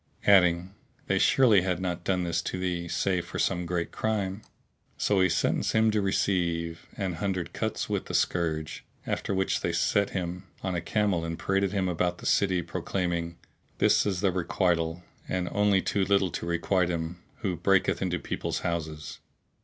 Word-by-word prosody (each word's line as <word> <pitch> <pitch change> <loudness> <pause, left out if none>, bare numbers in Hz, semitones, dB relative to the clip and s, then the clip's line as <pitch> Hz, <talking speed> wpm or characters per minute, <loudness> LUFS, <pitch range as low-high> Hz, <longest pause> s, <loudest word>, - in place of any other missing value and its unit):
adding, 90 -2 +4 0.3
"They - - +1
surely 115 -8 +5
had 90 -1 -1
not 90 -2 -3
done 90 -1 0
this 85 -1 0
to - - -4
thee, 90 -2 -2
save 90 +1 0
for - - -6
some 90 -1 0
great 85 -1 -2
crime." 105 -2 -2 0.6
So 100 -2 +2
he 95 - +4
sentenced - - +1
him 110 0 +4
to 105 -1 +1
receive 85 -4 0
an 95 -3 -2
hundred 95 -4 -2
cuts - - -2
with - - -2
the - - -3
scourge, 80 -3 -1 0.2
after - - -2
which 95 0 0
they - - 0
set 100 -1 +2
him 90 0 -4 0.2
on 95 -1 -1
a 85 - -1
camel 100 -2 0
and 85 0 -3
paraded 95 0 0
him 95 -2 0
about 90 0 0
the - - -11
city, 95 -3 +2
proclaiming, 85 0 -2 0.4
"This - - +4
is 95 -3 -1
the 100 -2 +3
requital 85 -1 0 0.3
and 90 -1 -1
only 105 -2 +3
too 100 - +1
little 95 -1 +2
to 85 - -4
requite 85 +1 +1
him 85 0 -3 0.2
who 95 -3 -1
breaketh 95 +1 +2
into 90 -2 0
people's - - -3
houses." 80 -3 -4
90 Hz, 175 wpm, -28 LUFS, 85-95 Hz, 0.6 s, surely